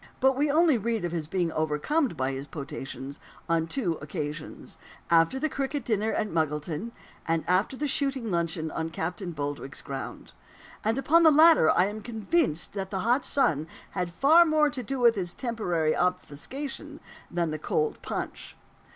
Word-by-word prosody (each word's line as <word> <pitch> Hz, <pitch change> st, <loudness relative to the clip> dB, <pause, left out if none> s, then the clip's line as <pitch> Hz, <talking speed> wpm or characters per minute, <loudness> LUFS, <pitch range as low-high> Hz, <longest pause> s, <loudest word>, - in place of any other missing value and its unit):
But 265 Hz, 0 st, +4 dB
we 290 Hz, +2 st, +1 dB
only 310 Hz, -3 st, +4 dB
read 225 Hz, -3 st, -1 dB
of 175 Hz, -, -2 dB
his 165 Hz, -3 st, -3 dB
being 175 Hz, -1 st, 0 dB
overcome 160 Hz, -, +1 dB
by 135 Hz, -, -2 dB
his 135 Hz, +1 st, -5 dB
potations 140 Hz, -2 st, -7 dB, 0.3 s
on 165 Hz, -1 st, +1 dB
two 175 Hz, -, -1 dB
occasions; 150 Hz, +1 st, -6 dB, 0.3 s
after 165 Hz, +9 st, +4 dB
the 310 Hz, -, 0 dB
cricket 275 Hz, -2 st, -3 dB
dinner 220 Hz, -1 st, +1 dB
at 215 Hz, -, 0 dB
Muggleton, 160 Hz, +4 st, -2 dB, 0.4 s
and 165 Hz, -1 st, +1 dB
after 190 Hz, +9 st, +1 dB
the 295 Hz, -, -2 dB
shooting 275 Hz, -3 st, -1 dB
luncheon 165 Hz, -2 st, -1 dB
on 165 Hz, 0 st, -3 dB
Captain 175 Hz, +3 st, -4 dB
Boldwig's 145 Hz, -3 st, -5 dB
ground. 135 Hz, -1 st, -7 dB, 0.5 s
And 220 Hz, +3 st, +1 dB
upon 320 Hz, +5 st, +4 dB
the 325 Hz, -, +8 dB
latter 310 Hz, -, +7 dB
occasion 180 Hz, +4 st, +4 dB
I -, -, -3 dB
am 215 Hz, +1 st, -7 dB
convinced 230 Hz, -, -1 dB
that 195 Hz, -2 st, -4 dB
the 190 Hz, -2 st, -2 dB
hot 245 Hz, +7 st, +2 dB
sun 165 Hz, -, +2 dB, 0.2 s
had 180 Hz, -2 st, -2 dB
far 290 Hz, -, +6 dB
more 310 Hz, -2 st, +3 dB
to 260 Hz, -, -4 dB
do 270 Hz, +4 st, -4 dB
with 240 Hz, -2 st, +5 dB
his 180 Hz, -5 st, -4 dB
temporary 180 Hz, -, 0 dB
obfuscation 270 Hz, -, -3 dB, 0.3 s
than 170 Hz, -2 st, -1 dB
the 155 Hz, -, -4 dB
cold 450 Hz, -, -1 dB
punch. -, -, -5 dB
190 Hz, 170 wpm, -27 LUFS, 160-270 Hz, 0.5 s, the